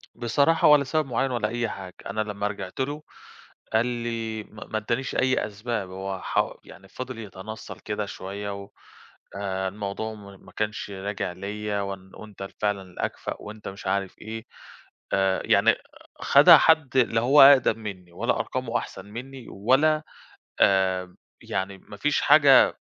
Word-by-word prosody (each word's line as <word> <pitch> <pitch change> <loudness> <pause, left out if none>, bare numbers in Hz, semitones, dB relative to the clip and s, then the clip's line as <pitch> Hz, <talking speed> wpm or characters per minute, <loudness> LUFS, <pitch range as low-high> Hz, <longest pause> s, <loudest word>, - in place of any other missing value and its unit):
بصراحة 140 +7 +3
ولا 150 -1 +7
سبب 155 +3 0
معيّن 130 +2 0
ولا 120 -3 0
أي 120 +1 -2
حاجة، 95 -3 -8
أنا 110 +2 -2
لما 105 -1 -2
رجِعت 100 -1 -7
له 145 +3 -2 0.7
قال 110 +2 +3
لي، 115 -2 -3
ما 105 +1 -12
ما 110 - -2
ادّانيش 120 +5 -2
أي 130 0 +2
أسباب، 105 -1 -4
هو 95 +1 -5
ح - - 0
يعني 95 0 -14
فضِل 130 +3 -7
يتنصّل 110 +1 -8
كده 105 0 -3
شوية 100 +1 -6
و 100 - -15 0.7
آآ 95 -1 -2
الموضوع 105 +2 -5
مو 100 -2 -12
ما - - -17
كانش 105 0 -3
راجع 100 -1 -4
ليَّ 105 +2 -4
وإن 95 -1 -6
وأنت 105 -2 -12
ال 95 - -6
فعلًا 105 -2 -1
الأكفأ 90 -2 -5
وأنت 105 0 -9
مش 95 0 -9
عارف 95 -1 -1
إيه 110 +1 -7 0.7
آآ، 95 -1 +2
يعني - - +4 0.5
خَدها - - +8
حد 155 -5 +3
لا 115 -3 +3
هو 135 +5 +6
أقدَم 135 -4 +7
منّي 95 -5 -8
ولا - - 0
أرقامه 125 -2 -2
أحسَن 95 - -9
منّي 125 +4 -9
ولا 140 +9 +2 0.6
آآ، 95 -2 +2 0.3
يعني 95 0 -3
ما - - -13
فيش - - +1
حاجة - - +6
105 Hz, 155 wpm, -25 LUFS, 100-120 Hz, 0.7 s, خَدها